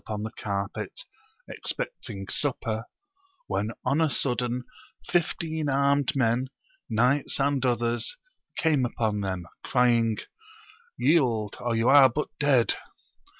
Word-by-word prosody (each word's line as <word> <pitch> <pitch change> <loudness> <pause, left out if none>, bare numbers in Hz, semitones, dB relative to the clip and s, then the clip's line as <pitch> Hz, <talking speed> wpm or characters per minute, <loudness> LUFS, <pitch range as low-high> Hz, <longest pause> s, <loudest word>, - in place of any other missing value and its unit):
upon 105 -1 -4
the 110 - -4
carpet, 100 - -4 0.5
expecting 110 - -4
supper, 115 -5 -1 0.6
when 105 - -1 0.2
on 150 +4 +2
a 160 - +3
sudden 125 -2 -1 0.4
fifteen 160 -3 -1
armed 140 0 +2
men, 125 0 +2 0.4
knights 125 +7 +2
and 140 -1 +1
others, 120 - -1 0.4
came 155 -5 +2
upon 110 -3 -1
them, 95 -3 -3 0.2
crying, 120 -3 +3 0.8
Yield 120 -10 +2
or 120 -1 -1
you 115 +1 +1
aire 140 -2 +8
but 150 +5 -3
dead 135 -5 +4
125 Hz, 110 wpm, -27 LUFS, 115-145 Hz, 0.8 s, aire